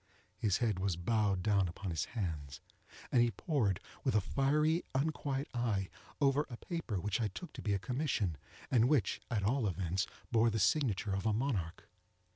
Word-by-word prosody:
His 100 -4 +2
head 110 -6 0
was 95 -2 0
bowed 100 +1 +1
down 100 -2 +3
upon 90 +2 -5
his 80 - -1
hands, 75 -8 -3 0.5
and 120 - +5
he 120 - +4
pored, 115 - 0 0.2
with - - +1
a - - +6
fiery 150 - +2
unquiet 140 -1 0
eye, 110 -6 0 0.3
over 140 0 +3
a 120 - -7
paper 160 - -3
which 105 +5 -1
I 110 - +2
took 135 - -8
to - - -7
be 105 -2 +1
a - - +2
commission, 120 - -1 0.4
and 120 -1 +5
which, 145 -8 +2
at 110 -5 0
all 115 +2 +2
events, 90 0 -1 0.2
bore 115 0 +4
the 110 - -1
signature 105 -4 +2
of 95 +3 -1
a 110 - +3
monarch. 105 -9 -2
110 Hz, 180 wpm, -34 LUFS, 95-135 Hz, 0.5 s, a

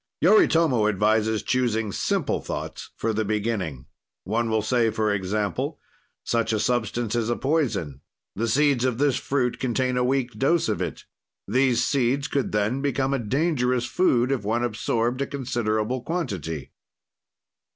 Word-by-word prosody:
Yoritomo 160 - +4
advises 110 +1 +1
choosing 115 -4 0
simple - - -1
thoughts - - -6
for 115 0 -1
the 110 +1 0
beginning. 100 - -2 0.4
"One 115 +4 -1
will 110 -1 +1
say, 115 0 +2
for 110 -1 0
example: 100 -2 -2 0.4
"Such 115 -1 0
a 110 - +1
substance 115 0 -1
is 120 -1 0
a 120 - +1
poison; 110 - -1 0.3
the 115 +4 -1
seeds 140 0 +3
of 125 -3 0
this 140 -1 +2
fruit 130 -3 -1
contain 130 0 0
a 125 - +2
weak 130 -1 0
dose 155 +7 +1
of - - -1
it; - - -4 0.4
these 125 +2 +2
seeds 135 +2 +1
could 140 -2 -1
then 105 +6 0
become 135 -1 0
a 135 - 0
dangerous 125 0 0
food, 125 -6 +2
if 135 -6 -1
one 115 +4 0
absorbed 120 +1 -1
a 140 - 0
considerable 120 -2 -1
quantity. 90 - -4
120 Hz, 150 wpm, -25 LUFS, 110-130 Hz, 0.4 s, Yoritomo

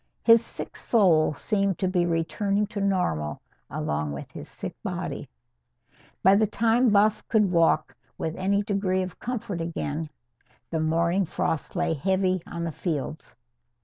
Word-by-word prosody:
His 230 0 +7
sick - - -7
soul 170 -9 +3
seemed 200 +1 0
to 190 - 0
be 180 -2 +1
returning 195 +5 0
to 200 - -2
normal 180 - 0 0.3
along 75 0 -2
with 70 - -8
his - - -9
sick - - -7
body. - - -4 0.9
By 190 - +7
the 210 +2 +4
time 230 +3 +3
Buff 210 +1 +4
could 210 -4 +3
walk 165 -6 +2 0.2
with 160 0 -3
any 200 +2 +1
degree 195 -2 0
of 185 -2 -8
comfort 215 -7 -4
again, 160 -2 -3 0.6
the 165 - 0
morning 170 +4 +2
frost 160 -1 -2
lay 175 -2 +1
heavy 185 +3 +1
on 170 -1 -5
the 165 - -2
fields. 155 -1 -4
185 Hz, 145 wpm, -26 LUFS, 165-200 Hz, 0.9 s, His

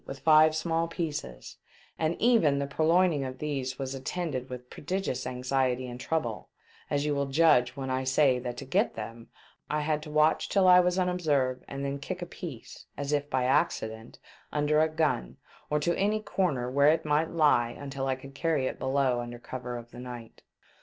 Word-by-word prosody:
with 135 - -6
five 155 +1 +5
small 165 +1 0
pieces, 155 - -5 0.4
and 160 +1 0
even 220 - +4
the 140 - -1
purloin 165 +5 +3
ing 145 -2 -1
of 130 -1 -5
these 135 -3 -3
was 135 -1 -4
attended 135 -1 -4
with 125 -1 -8
prodigious 150 -6 -3
anxiety 130 0 0
and 125 0 -7
trouble, 130 -6 -3 0.4
as 145 0 0
you 150 - +1
will 140 -1 -1
judge 135 -4 +4
when 135 -1 -4
I 130 0 0
say 130 -1 +3
that 120 -1 -5
to 140 - -6
get 190 - +1
them 115 +1 -7 0.4
I 150 0 0
had 150 0 0
to 150 - -9
watch 155 +1 +2
till 195 -2 +3
I 180 0 +8
was 180 0 +2
unobserved 150 -9 0
and 140 0 -5
then 140 0 -3
kick 180 +5 -5
a - - -4
piece, 160 -8 -9
as 145 +1 -2
if 145 0 0
by 130 -2 +1
accident, 120 -5 0 0.3
under 150 +1 +2
a 160 - +3
gun, 155 - -1 0.3
or 150 - +1
to 170 +3 +1
any 210 +2 +1
corner 175 -12 -1
where 140 +3 +4
it 160 0 -1
might 150 +2 +1
lie 145 -8 +3
until 135 +1 -5
I 130 - +1
could 135 +1 -12
carry 155 -2 0
it - - -3
below 130 -2 +1
under 120 0 -6
cover 125 0 -6
of 120 0 -11
the 120 - -11
night. 125 -2 -9
140 Hz, 195 wpm, -28 LUFS, 130-160 Hz, 0.4 s, I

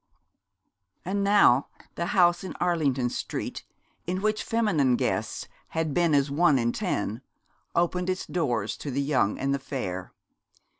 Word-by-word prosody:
And 200 +2 -1
now 200 -10 +5 0.3
the 170 - -3
house 175 -1 +3
in 190 - -6
Arlington 140 -8 +1
Street - - -4 0.4
in 185 +1 -1
which 215 0 +1
feminine 180 - +2
guests - - -2 0.2
had 160 -2 -2
been 170 -2 +3
as 140 0 +2
one 150 -1 +4
in 120 -1 +1
ten, 120 - -2 0.5
opened 180 +1 +1
its 185 0 -2
doors 120 - -1
to 145 - -6
the 135 +1 -2
young 135 -8 +1
and 135 +1 0
the 140 - -1
fair. 95 -10 -5
155 Hz, 145 wpm, -27 LUFS, 130-180 Hz, 0.5 s, now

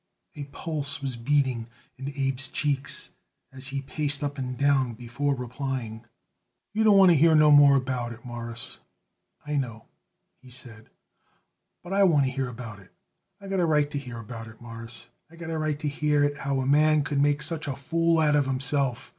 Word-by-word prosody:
A 145 - -7
pulse 145 0 -2
was 135 -2 -2
beating 125 -2 0 0.3
in 135 +1 -7
Abe's 135 -1 0
cheeks 140 0 -2 0.4
as 130 0 -6
he 140 0 -3
paced 145 0 -1
up 145 -1 -3
and 125 -1 -4
down 135 -4 +2
before 125 +5 -2
replying. 125 -3 -5 0.7
"You 220 +1 +1
don't 210 -2 +6
want 190 -2 +7
to - - +5
hear 160 +2 +5
no 150 -1 +6
more 145 -1 +8
about 125 -2 -1
it, 115 +1 -11
Mawruss, 120 +1 -6 0.7
I 150 0 -1
know," 115 -5 -4 0.6
he 130 - -15
said; 120 -3 -11 0.9
"but 180 +2 -6
I 200 - +3
want 160 -8 +5
to 130 - -1
hear 135 0 -2
about 115 -4 -8
it. 95 - -19 0.5
I 200 - -11
got 195 -1 -1
a 175 - +3
right 150 -2 +2
to 145 - -2
hear 125 -4 -8
about 115 0 -8
it, 110 0 -14
Mawruss. 115 0 -9 0.2
I 170 - -16
got 170 -1 -7
a 160 - -2
right 155 -1 -1
to 150 0 -4
hear 150 0 +1
it 145 0 0
how 140 -1 -1
a - - -2
man 150 +2 +4
could 145 0 0
make 145 +1 +2
such 155 0 -2
a 140 - -2
fool 165 +4 +1
out 150 -1 +3
of 145 -2 +2
himself. 135 -1 -1
140 Hz, 195 wpm, -26 LUFS, 125-150 Hz, 0.9 s, more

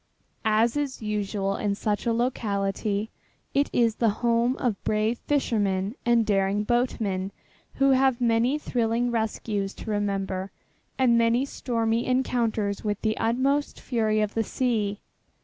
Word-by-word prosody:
As 220 +3 +3
is 285 -5 -3
usual 205 -2 -1
in 200 -1 -1
such 210 +3 -2
a - - +3
locality 210 -3 -1 0.4
it 280 +1 +2
is 230 -2 +2
the 230 - +3 0.2
home 235 +2 +2
of 230 -6 -2
brave 215 +2 0
fishermen 205 -8 0
and 235 -1 +4
daring 200 0 +1
boatmen 210 -5 0 0.4
who 275 0 +4
have 265 -1 +3
many 240 +3 +2
thrilling 240 -3 0
rescues 215 -3 -2
to 220 - -6
remember 195 -2 -2 0.5
and 240 -3 +4
many 230 +3 +3
stormy 230 -3 -1
encounters 230 -5 0
with 210 -2 -1
the 215 -1 +1
utmost 270 +5 0
fury 220 -3 0
of 210 0 -1
the 225 - +1
sea. 215 -4 -1
225 Hz, 135 wpm, -26 LUFS, 205-240 Hz, 0.5 s, and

